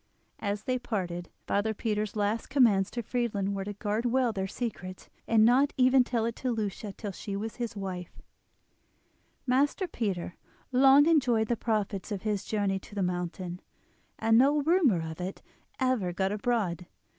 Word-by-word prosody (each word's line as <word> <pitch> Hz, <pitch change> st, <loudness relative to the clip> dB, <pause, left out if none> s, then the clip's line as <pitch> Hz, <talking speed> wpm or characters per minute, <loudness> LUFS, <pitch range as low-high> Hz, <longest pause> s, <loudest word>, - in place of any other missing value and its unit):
As 205 Hz, 0 st, -2 dB
they 255 Hz, +1 st, -1 dB
parted, 175 Hz, -7 st, -3 dB, 0.2 s
father 215 Hz, +2 st, 0 dB
Peter's 210 Hz, -1 st, -2 dB
last 210 Hz, +2 st, -1 dB
commands 225 Hz, -8 st, +4 dB
to 235 Hz, -, -4 dB
Friedlin 210 Hz, -4 st, -1 dB
were 195 Hz, -1 st, -3 dB
to 205 Hz, -, -4 dB
guard 210 Hz, +2 st, -2 dB
well 245 Hz, -1 st, +2 dB
their 190 Hz, -2 st, -2 dB
secret, 195 Hz, -4 st, -6 dB, 0.2 s
and 220 Hz, -1 st, +5 dB
not 260 Hz, +4 st, +4 dB
even 255 Hz, 0 st, +5 dB
to -, -, -16 dB
tell 230 Hz, -2 st, +1 dB
it 230 Hz, 0 st, -2 dB
to 255 Hz, -, -2 dB
Lucia 210 Hz, -3 st, -3 dB
till 205 Hz, +1 st, -6 dB
she 195 Hz, +1 st, -6 dB
was 215 Hz, +2 st, -5 dB
his 235 Hz, -3 st, -4 dB
wife. 185 Hz, -3 st, -6 dB, 1.3 s
Master 280 Hz, +9 st, +2 dB
Peter 195 Hz, -, -3 dB, 0.3 s
long 270 Hz, +3 st, +6 dB
enjoyed 250 Hz, -9 st, +3 dB
the 240 Hz, -, +2 dB
profits 215 Hz, -3 st, -2 dB
of 195 Hz, -2 st, -3 dB
his 210 Hz, -3 st, -1 dB
journey 200 Hz, -3 st, 0 dB
to 205 Hz, -, -14 dB
the 200 Hz, -, 0 dB
mountain, 180 Hz, 0 st, -3 dB, 0.6 s
and 225 Hz, +1 st, +4 dB
no 285 Hz, +3 st, +4 dB
rumour 290 Hz, -, +3 dB
of 160 Hz, +2 st, -7 dB
it 185 Hz, +2 st, -5 dB, 0.4 s
ever 255 Hz, -9 st, +1 dB
got 190 Hz, +2 st, -1 dB
abroad. 205 Hz, -5 st, -1 dB
215 Hz, 170 wpm, -29 LUFS, 195-245 Hz, 1.3 s, long